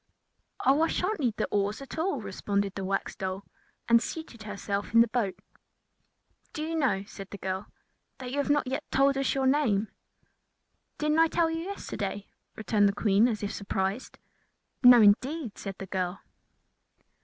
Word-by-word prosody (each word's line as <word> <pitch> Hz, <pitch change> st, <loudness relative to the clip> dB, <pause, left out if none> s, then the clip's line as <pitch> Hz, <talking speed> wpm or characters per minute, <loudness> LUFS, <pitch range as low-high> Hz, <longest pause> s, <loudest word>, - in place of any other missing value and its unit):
"Oh, 275 Hz, +3 st, +4 dB
I 325 Hz, -, +4 dB
shall 360 Hz, -, -1 dB
not 430 Hz, -, -3 dB
need 240 Hz, -7 st, 0 dB
the -, -, 0 dB
oars 205 Hz, +1 st, 0 dB
at 275 Hz, +3 st, -8 dB
all," 320 Hz, -7 st, 0 dB
responded 200 Hz, 0 st, -2 dB
the 195 Hz, -, -5 dB
Wax 195 Hz, +1 st, -2 dB
Doll, 190 Hz, +1 st, -4 dB, 0.4 s
and 235 Hz, 0 st, +5 dB
seated 315 Hz, -8 st, -7 dB
herself 205 Hz, 0 st, -4 dB
in 230 Hz, -, +9 dB
the 235 Hz, -, +4 dB
boat. 210 Hz, -6 st, -1 dB, 1.2 s
"Do 305 Hz, -, -4 dB
you 320 Hz, +1 st, -3 dB
know," 265 Hz, -11 st, +1 dB
said 195 Hz, -1 st, -10 dB
the 200 Hz, -, -7 dB
girl, 190 Hz, +1 st, -4 dB, 0.5 s
"that 250 Hz, -1 st, -7 dB
you 280 Hz, -, -3 dB
have 285 Hz, -, -1 dB
not 290 Hz, -1 st, +3 dB
yet 270 Hz, +4 st, -3 dB
told 275 Hz, +1 st, +3 dB
us 270 Hz, 0 st, 0 dB
your 270 Hz, -1 st, +1 dB
name?" 250 Hz, -7 st, +2 dB, 1.1 s
"Didn't 300 Hz, +1 st, +1 dB
I 325 Hz, -, +6 dB
tell 330 Hz, 0 st, +1 dB
you 325 Hz, -, -2 dB
yesterday?" 205 Hz, -, -5 dB, 0.3 s
returned 210 Hz, -2 st, +2 dB
the -, -, -1 dB
Queen, 205 Hz, +2 st, +3 dB
as 215 Hz, -4 st, -3 dB
if 205 Hz, -, -2 dB
surprised. 195 Hz, +3 st, -3 dB, 0.6 s
"No, 245 Hz, -3 st, +9 dB
indeed," 250 Hz, +5 st, +2 dB
said 195 Hz, -2 st, -5 dB
the 195 Hz, -, -6 dB
girl. 185 Hz, -1 st, -3 dB
225 Hz, 175 wpm, -28 LUFS, 200-280 Hz, 1.2 s, in